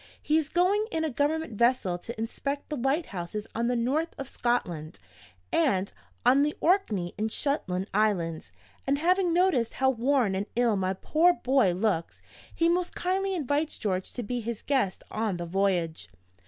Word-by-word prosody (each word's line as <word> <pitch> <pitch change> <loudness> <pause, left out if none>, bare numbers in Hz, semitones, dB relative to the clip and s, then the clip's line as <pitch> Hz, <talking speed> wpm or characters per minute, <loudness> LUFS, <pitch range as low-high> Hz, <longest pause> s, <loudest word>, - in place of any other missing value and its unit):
He 310 +1 +2
is 310 -1 -4
going 385 +6 +2
in 320 -5 -1
a 315 - -1
Government 295 +1 0
vessel 235 -7 +2
to 230 +5 -8
inspect 280 +5 -4
the 300 - -2
lighthouses 220 - -2
on 230 +1 0
the 245 - +1
North 280 +8 0
of 275 - -5
Scotland, 175 - -2 0.5
and 190 +3 +2 0.3
on 260 +3 +6
the 300 +1 0
Orkney 220 - +1
and 220 +1 -1
Shetland 195 -11 -1
Islands 175 - 0 0.4
and, 280 +1 +2
having 360 +3 +2
noticed 335 -10 +2
how 265 0 +3
worn 250 -3 +1
and 195 +2 -2
ill 235 -2 +3
my 190 -1 0
poor 320 - +3
boy 260 - +2
looks, 185 -3 -1 0.3
he 335 - +1
most 350 +1 0
kindly 385 +2 0
invites 295 0 -1
George 190 -4 -2
to 245 - -4
be 245 +3 -3
his 230 -1 -5
guest 255 -10 0
on 215 -4 -1
the 175 - -4
voyage. 175 -3 0
245 Hz, 170 wpm, -28 LUFS, 195-305 Hz, 0.5 s, on